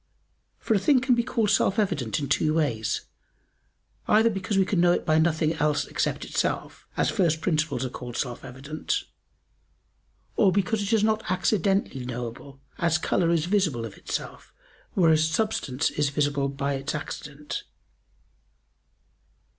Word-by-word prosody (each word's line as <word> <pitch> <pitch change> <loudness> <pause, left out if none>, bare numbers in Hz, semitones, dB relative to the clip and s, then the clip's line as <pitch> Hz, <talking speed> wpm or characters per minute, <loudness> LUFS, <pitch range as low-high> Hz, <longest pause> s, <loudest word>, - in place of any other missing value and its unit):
For - - 0
a 205 - +3
thing 275 +6 +4
can 260 0 +2
be 240 - +3
called 230 -4 0
self 200 0 +2
evident 170 - 0
in 145 - -2
two 155 +3 +2
ways, 120 -9 0 1.1
either 220 +2 +5
because 195 0 -2
we 190 - +4
can 185 -2 +1
know 175 0 +5
it - - -2
by 155 -2 +3
nothing 160 -1 +2
else 150 -2 +1
except - - -2
itself, - - -2
as - - +2
first 170 -6 +2
principles 155 -6 0
are - - -3
called 120 -1 -7
self 125 -3 -3
evident; 140 - -3 1.3
or 195 -3 +4
because 205 +3 +1
it 200 +1 -2
is 220 -2 +3
not 220 0 +1
accidentally 190 - +1
knowable, 125 +2 -6 0.2
as 170 -2 +2
color 170 +1 +1
is 170 -2 +2
visible 175 - +1
of 110 - -8
itself, - - -6 0.4
whereas 160 -3 +4
substance 160 - 0
is 145 -1 0
visible 140 -1 0
by 140 +1 -2
its 135 +2 -3
accident. 150 0 -6
160 Hz, 150 wpm, -26 LUFS, 140-200 Hz, 1.3 s, either